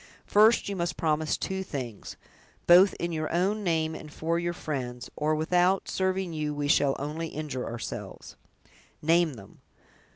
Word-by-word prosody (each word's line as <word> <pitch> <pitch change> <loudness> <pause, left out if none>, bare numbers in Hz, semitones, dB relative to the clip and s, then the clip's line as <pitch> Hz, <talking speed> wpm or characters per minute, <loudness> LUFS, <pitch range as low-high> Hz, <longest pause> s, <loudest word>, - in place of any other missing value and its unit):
First, 215 +3 +5
you 200 - -3
must 175 -1 -2
promise 155 -1 0
two 190 0 -3
things, 130 - -6 0.5
both 180 +2 +7
in 170 0 -3
your 155 -1 -2
own 195 +5 +1
name 160 -3 0
and 155 -1 -9
for 165 +3 -1
your 175 0 -1
friends, 125 -7 -5
or 155 +1 +1
without 180 +4 +2
serving 190 -2 -1
you 150 -1 -2
we 145 0 -2
shall 145 -2 +3
only 155 +4 -4
injure 150 -5 -5
ourselves!" 115 0 -7 0.7
"Name 165 -2 +3
them." 100 -4 -14
160 Hz, 155 wpm, -28 LUFS, 150-175 Hz, 0.7 s, both